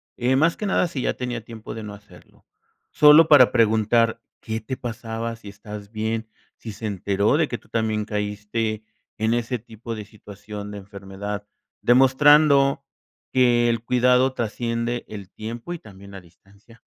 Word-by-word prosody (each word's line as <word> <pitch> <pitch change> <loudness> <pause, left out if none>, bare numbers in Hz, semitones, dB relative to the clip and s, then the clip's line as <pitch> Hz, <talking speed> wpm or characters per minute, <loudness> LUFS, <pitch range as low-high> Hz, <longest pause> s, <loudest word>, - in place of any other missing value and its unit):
Eh, 125 +2 +1
más 165 +4 +3
que 210 - -3
nada, 185 -2 +2
si 140 -5 -5
ya - - -1
tenía 120 -2 -4
tiempo 110 -1 -9
de 110 - -7
no 105 -1 -8
hacerlo, 105 0 -19 0.5
solo 150 +2 +7
para 145 -5 +7
preguntar 110 +1 +2 0.2
qué 110 -1 -4
te 130 +4 -5
pasaba, 115 -1 -5
si 105 -3 -11
estabas 105 0 -10
bien, 110 +1 -3 0.3
si 110 - -8
se 110 +2 -8
enteró 100 +3 0
de 160 -2 +2
que 120 - -4
tú - - -25
también 110 -2 -1
caíste 105 +1 -3 0.3
en 110 +1 +1
ese 120 +1 -1
tipo 115 0 -9
de 105 -1 -7
situación 105 0 -10
de 105 - -7
enfermedad. 100 +1 -7 0.3
Demostrando 140 +2 +5 0.5
que 120 -2 +4
el 115 -1 -1
cuidado 125 +1 +3
trasciende 115 +1 -3
el 100 -3 -9
tiempo 115 +9 -7
y 175 - -7
también 100 -3 -14
la 100 -1 -9
distancia. 100 +6 -22
115 Hz, 165 wpm, -23 LUFS, 105-125 Hz, 0.5 s, solo